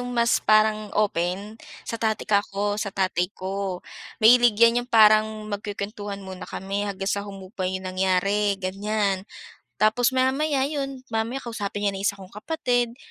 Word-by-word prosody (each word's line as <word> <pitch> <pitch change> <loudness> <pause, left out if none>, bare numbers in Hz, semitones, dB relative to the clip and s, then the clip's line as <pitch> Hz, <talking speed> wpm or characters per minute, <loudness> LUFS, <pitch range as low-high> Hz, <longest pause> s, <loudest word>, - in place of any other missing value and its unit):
'yong 245 - -4
mas 235 -1 +2
parang 215 0 +3
open, 200 +2 -1 0.2
sa 230 - -5
tatay 220 -2 0
kako, 205 0 0
sa 210 - -2
tatay 185 -2 0
ko, 190 -1 -4 0.4
mahilig 240 -1 +7
'yan 235 +1 +5
'yong 245 - -15
parang 215 -1 +6 0.2
magkukuwentuhan 205 0 -5
muna 190 -1 -8
kami 200 +2 -3
hanggang 195 0 -3
sa 200 - -1
humupa 195 -1 -5
'yong 185 0 -4
nangyari, 190 +2 +1
ganiyan. 195 0 -1 0.6
Tapos, 220 +4 +3
maya-maya 265 +2 +1
'yon, 275 -3 -4
mamaya 225 +4 -1
kausapin 205 -4 -4
niya 200 - +1
na 195 - -5
yung - - -2
1 200 - -6
kong 190 0 -13
kapatid 245 0 -1
205 Hz, 155 wpm, -24 LUFS, 195-230 Hz, 0.6 s, mahilig